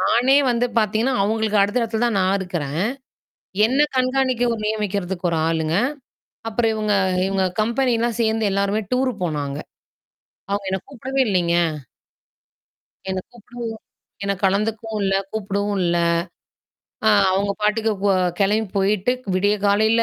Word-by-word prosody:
நானே 250 +8 +4
வந்து 240 +1 +1
பாத்தீங்கன்னா 220 +4 +1
அவங்களுக்கு 215 0 +1
அடுத்த 205 +5 +2
இடத்துல 225 0 -2
தான் 225 -4 0
நான் 190 +1 +2
இருக்கறேன், 165 -5 -3 0.9
என்ன 260 +5 0 0.2
கண்காணிக்க 255 -1 +1
ஒரு 225 - -5
நியமிக்க 200 -4 -2
1 165 - 0
ஆளுங்க. 160 -1 0 0.7
அப்புறம் 225 0 +1
இவங்க 215 -1 0 0.3
இவங்க 195 -1 +1 0.2
கம்பெனிலாம் 235 -1 0
சேர்ந்து 220 -2 +1
எல்லாருமே 200 +2 0
டூர் 255 0 +1
போனாங்க. 145 -4 -3 0.9
அவங்க 200 0 -2
என்ன 190 - -1
கூப்பிடவே 265 0 -1
இல்லைங்க. 175 -3 +1 1.5
என்ன 190 0 -1
கூப்பிடவும் 240 0 -7 0.5
என்ன 200 - +1
கலந்துக்கவும் 215 +2 0
இல்ல, 195 - +1 0.2
கூப்பிடவும் 200 -1 -2
இல்ல. 175 0 +1 1.1
ஆ - - +7 0.2
அவங்க 200 +2 +1
பாட்டுக்கு 220 +1 +1
போ 200 - +4 0.3
கிளம்பி 210 +1 +2
போயிட்டு 200 +4 +2 0.2
விடிய 205 +3 +2
காலையில 220 +3 +3
210 Hz, 125 wpm, -21 LUFS, 195-230 Hz, 1.5 s, ஆ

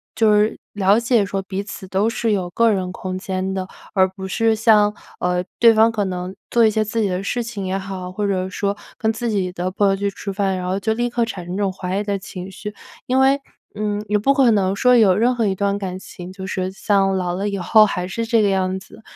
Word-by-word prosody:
就 220 -1 +4
是 210 +1 +2 0.2
了 200 +2 +3
解 235 -3 +2
说 195 0 -3
彼 190 +1 -4
此 195 -2 -8
都 195 +4 +1
是 230 -1 -1
有 185 -3 -1
个 230 +4 +3
人 185 -2 -1
空 185 0 -5
间 190 0 -3
的， 190 -1 -3 0.3
而 190 -2 +4
不 190 0 -8
是 225 +3 +2
像， 215 -2 +4 0.3
呃， 180 0 0 0.2
对 230 -1 +7
方 220 +1 +5
可 210 -3 -1
能 185 0 -4
做 235 -1 +4
一 220 - +4
些 215 0 +1
自 225 +2 -2
己 205 - +2
的 185 0 -2
事 240 +4 -1
情 220 -4 -5
也 190 +1 -1
好， 190 -2 -6
或 205 +2 -2
者 185 -1 -1
说 200 +1 -2 0.2
跟 220 0 +1
自 235 +2 -3
己 195 -4 -1
的 180 0 -3
朋 200 +1 +2
友 195 - +2
去 200 +1 -1
吃 200 0 -6
饭， 195 -1 0
然 180 - -4
后 190 +2 -1
就 220 +3 0
立 240 +2 -1
刻 235 0 0
产 190 -6 -6
生 180 - -5
这 205 - -2
种 195 - +1
怀 185 0 -4
疑 - - -1
的 200 -1 -1
情 185 0 -8
绪。 210 +2 -7 0.3
因 260 +1 +1
为， 270 +1 +4 0.4
嗯， 210 0 -2
也 210 - +2
不 275 +6 +3
可 260 -4 +5
能 195 -2 +2
说 250 +4 +4
有 205 -6 +5
任 240 +5 +2
何 230 -2 0
一 195 - +1
段 200 +1 0
感 185 -2 -4
情， 180 -1 -10
就 190 0 -7
是 185 0 -2
像 195 -1 +1
老 180 -1 -1
了 200 +2 -2
以 200 - -3
后 215 +4 +5
还 180 -2 -3
是 230 +4 -3
这 225 0 +3
个 200 - +3
样 190 -1 0
子。 215 - -15
200 Hz, 275 characters per minute, -20 LUFS, 190-220 Hz, 0.4 s, 对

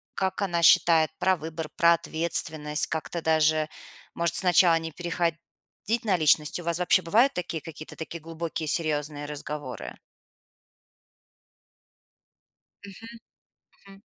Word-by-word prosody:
как 190 0 -2
она 175 -4 -1
считает 160 -1 +5
про 185 -1 +2
выбор, 160 0 -7
про 170 0 +5
ответственность, 160 -2 +2
как-то 165 +1 -5
даже, 155 -1 +1 0.5
может, 170 -1 -1
сначала 175 -2 +5
не 165 0 -7
переходить 170 0 -3 0.7
на 195 -4 +2
личность? 155 0 +2
У - - -8
вас 170 +1 -2
вообще 180 - +3
бывают 235 +11 +2
такие 170 -3 -4
какие-то 155 -1 -11
такие 165 +1 -8
глубокие 165 0 -6
серьёзные 150 -2 -1
разговоры? 145 -2 -7 2.9
Мгм. 225 +4 -12 0.7
Мгм. 195 0 -16
165 Hz, 115 wpm, -26 LUFS, 155-175 Hz, 2.9 s, считает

